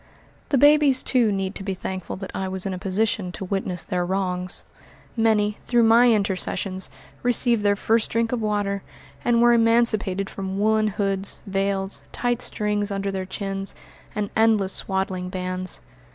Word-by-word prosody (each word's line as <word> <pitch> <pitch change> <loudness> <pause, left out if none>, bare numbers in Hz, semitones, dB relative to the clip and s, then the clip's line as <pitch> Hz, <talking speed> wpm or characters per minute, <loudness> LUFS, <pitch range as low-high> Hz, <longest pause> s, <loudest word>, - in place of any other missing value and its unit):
The 280 - +3
babies, 290 -1 +5
too, 240 -5 +2
need 195 -1 -2
to - - -3
be 195 -1 -3
thankful 185 0 -5
that 190 0 -7
I 190 - -2
was 190 0 -3
in 195 - -2
a 185 - -5
position 195 0 -1
to 190 - -5
witness 185 -2 -2
their 180 -1 -1
wrongs. 180 -1 -1 0.5
Many, 215 -2 +2
through 240 -1 +2
my 235 +2 +6
intercessions, 190 -2 0 0.3
received 240 -2 +2
their 205 0 +3
first 220 +2 +2
drink 230 0 0
of 245 -2 -1
water, 205 -2 -1 0.4
and 235 -1 +3
were 240 0 +6
emancipated 230 -4 +2
from 190 -1 -5
woolen 215 +1 +2
hoods, 195 -1 -1
veils, 195 0 -1
tight 245 0 -1
strings 210 -2 -1
under 200 0 -2
their 190 -1 -4
chins, 195 0 -3 0.4
and 205 -1 -2
endless 220 -4 +3
swaddling 190 -1 -2
bands. 185 0 -4
200 Hz, 160 wpm, -24 LUFS, 190-225 Hz, 0.5 s, my